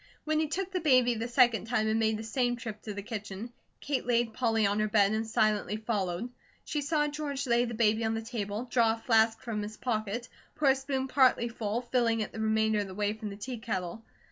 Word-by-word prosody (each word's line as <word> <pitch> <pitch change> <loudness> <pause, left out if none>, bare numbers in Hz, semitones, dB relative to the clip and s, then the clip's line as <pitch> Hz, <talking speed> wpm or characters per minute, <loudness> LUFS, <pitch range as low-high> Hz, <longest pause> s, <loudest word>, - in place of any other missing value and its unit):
When 310 0 +1
he 315 - +1
took 380 +4 -3
the 370 - -1
baby 255 -6 +4
the 230 +1 -3
second 235 -4 +3
time 225 -2 +1
and 220 +1 +1
made 220 -1 +2
the 220 - -6
same 245 +1 0
trip 220 -3 -7
to 210 - -6
the 200 - -5
kitchen, 215 +1 -6 0.3
Kate 280 -2 -1
laid 235 -2 +2
Polly 225 -3 +1
on 200 +1 +1
her 215 - +2
bed 205 -2 +4
and 220 +1 -1
silently 215 -2 +1
followed. 215 0 -2 0.3
She 300 - -2
saw 295 +1 +1
George 290 -2 -3
lay 240 -1 +3
the 235 -1 -5
baby 220 0 +2
on 220 0 0
the 225 - -3
table, 220 -2 -3
draw 235 -2 +3
a 225 - -16
flask 225 -1 +4
from 220 -3 -3
his 210 +1 -6
pocket, 230 -1 -2 0.3
pour 295 -3 +3
a 265 - +5
spoon 270 -1 -2
partly 255 -3 +3
full, 225 0 -2
filling 235 -2 +1
it 215 - -3
the - - -8
remainder 220 0 +2
of 205 - -2
the 190 - -9
way 205 0 0
from 215 -1 -6
the 200 - -8
teakettle. 220 -5 -4
225 Hz, 230 wpm, -30 LUFS, 215-250 Hz, 0.3 s, a